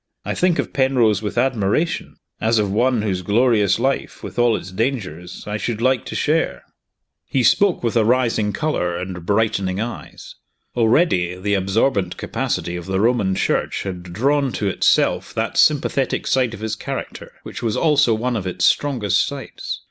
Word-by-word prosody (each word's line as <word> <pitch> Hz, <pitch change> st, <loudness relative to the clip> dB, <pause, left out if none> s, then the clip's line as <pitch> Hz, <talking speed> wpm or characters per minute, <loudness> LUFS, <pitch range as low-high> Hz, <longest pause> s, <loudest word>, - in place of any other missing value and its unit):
I -, -, -2 dB
think 180 Hz, -2 st, +1 dB
of -, -, -3 dB
Penrose 125 Hz, -7 st, +2 dB
with 105 Hz, +1 st, -5 dB
admiration, 125 Hz, -, 0 dB, 0.2 s
as 115 Hz, +1 st, +2 dB
of 105 Hz, -2 st, +1 dB
one 120 Hz, +1 st, +1 dB
whose 95 Hz, -4 st, -1 dB
glorious 105 Hz, +1 st, +2 dB
life, 135 Hz, -3 st, -2 dB
with 100 Hz, +1 st, -6 dB
all 120 Hz, -2 st, +4 dB
its 95 Hz, -, -9 dB
dangers, 95 Hz, -, -3 dB
I 105 Hz, 0 st, -3 dB
should 110 Hz, 0 st, -3 dB
like 130 Hz, 0 st, +1 dB
to -, -, -6 dB
share!" -, -, 0 dB, 0.6 s
He 130 Hz, -, 0 dB
spoke 195 Hz, +5 st, +3 dB
with 115 Hz, -1 st, -1 dB
a 115 Hz, -, +4 dB
rising 115 Hz, -3 st, +1 dB
color 95 Hz, -, -1 dB
and 90 Hz, -1 st, -6 dB
brightening 100 Hz, -3 st, 0 dB
eyes. 120 Hz, +2 st, -7 dB, 0.4 s
Already, 110 Hz, -, +2 dB
the 100 Hz, +2 st, -1 dB
absorbent 100 Hz, 0 st, 0 dB
capacity 85 Hz, -, -3 dB
of 85 Hz, 0 st, -7 dB
the 95 Hz, 0 st, -1 dB
Roman 105 Hz, -4 st, +2 dB
Church -, -, -1 dB
had 95 Hz, -2 st, -5 dB
drawn 135 Hz, +10 st, 0 dB
to 105 Hz, -, -2 dB
itself 95 Hz, -, +1 dB
that -, -, -1 dB
sympathetic -, -, +2 dB
side 125 Hz, -3 st, +1 dB
of 105 Hz, -, -12 dB
his 110 Hz, 0 st, -2 dB
character -, -, -6 dB
which -, -, -8 dB
was 115 Hz, -3 st, -1 dB
also 145 Hz, -7 st, +3 dB
one 120 Hz, +3 st, -1 dB
of 95 Hz, -4 st, -3 dB
its 90 Hz, 0 st, 0 dB
strongest 125 Hz, -9 st, +2 dB
sides. -, -, -6 dB
110 Hz, 170 wpm, -20 LUFS, 95-125 Hz, 0.6 s, all